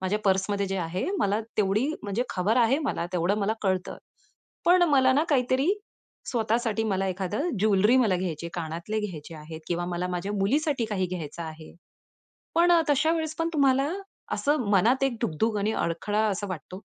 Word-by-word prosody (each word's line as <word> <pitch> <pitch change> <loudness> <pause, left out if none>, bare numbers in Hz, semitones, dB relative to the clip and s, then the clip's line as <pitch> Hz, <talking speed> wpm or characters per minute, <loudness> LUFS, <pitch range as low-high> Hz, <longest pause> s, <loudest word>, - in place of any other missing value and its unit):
माझ्या 190 +3 0
पर्समध्ये 195 +1 +1
जे 195 0 -2
आहे, 175 +2 -2
मला 210 -6 +1 0.2
तेवढी 210 +4 +2 0.2
म्हणजे 205 +4 -1
खबर 200 +5 +1
आहे 250 +4 +4
मला. 275 - -2
तेवढं 180 +4 +1
मला 205 +1 +1
कळतं. 185 -1 -1 0.7
पण 355 +1 +6
मला 260 -2 +5
ना 295 +4 +3
काहीतरी 260 +2 +2 0.6
स्वतःसाठी 225 -1 0
मला 195 -3 0
एखादं 195 - -2
ज्वेलरी 210 +3 +4
मला 220 -8 +3
घ्यायची 170 -3 -3
आहे, - - -7
कानातले 170 +5 -3
घ्यायचे 165 -6 -6
आहेत 160 +1 -9
किंवा 175 0 -1
मला 180 +1 -2
माझ्या 180 +3 -3
मुलीसाठी 255 +7 +1
काही 190 -4 -1
घ्यायचं 170 -2 -6
आहे. 160 0 -9 0.8
पण 345 +1 +4
अ, 340 - +6
तशावेळेस 315 +2 +1
पण 330 0 0
तुम्हाला 275 +1 +3 0.4
असं 285 -6 0
मनात 230 +7 +3
एक 270 - 0
धुग-धुग 215 +4 0
आणि 205 +2 0
अडखळा 205 +4 -1
असा 205 0 -2
वाटतो. 185 +2 -7
205 Hz, 165 wpm, -26 LUFS, 180-255 Hz, 0.8 s, पण